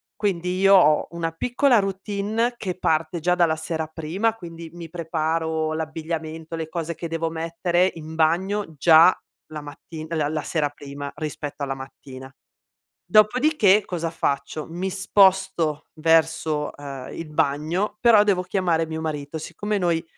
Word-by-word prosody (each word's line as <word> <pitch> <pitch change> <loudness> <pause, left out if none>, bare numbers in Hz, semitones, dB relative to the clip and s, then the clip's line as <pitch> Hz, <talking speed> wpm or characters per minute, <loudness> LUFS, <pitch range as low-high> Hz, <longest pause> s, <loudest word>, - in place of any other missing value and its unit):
quindi 185 -3 -1
io 195 0 +6
ho 155 -4 +5
una 165 -1 -3
piccola 245 - +2
routine 200 +4 -1
che 185 -6 -4
parte 160 0 0
già 180 +2 +2
dalla 170 -3 +3
sera 160 0 -3
prima, 175 +8 -1
quindi 165 -4 -9
mi 170 -2 -9
preparo 160 -1 -1
l'abbigliamento, 160 0 -5
le 160 -1 -5
cose 170 -1 -4
che 170 - -6
devo 165 0 -1
mettere 170 +3 0
in 160 0 -8
bagno 175 +3 +1
già 165 +3 +7 0.3
la 155 -1 -7
matti 155 +2 -9
la 155 -3 0
la 155 -1 -2
sera 150 -3 0
prima 140 0 -8
rispetto 150 -2 -5
alla 135 -1 -2
mattina. 135 0 -10 0.7
Dopodiché, 215 - +4
cosa 165 -2 -3
faccio, 140 -1 -2
mi 180 +3 -3
sposto 190 -5 +2
verso, 160 -1 +1
ehm, 140 -3 -8
il 165 -2 -6
bagno, 155 +9 0
però 230 -3 +6
devo 190 -3 +2
chiamare 180 -3 0
mio 160 0 -5
marito. 150 -1 -4
Siccome 205 +6 -3
noi, 170 -2 0
165 Hz, 145 wpm, -23 LUFS, 155-185 Hz, 0.7 s, già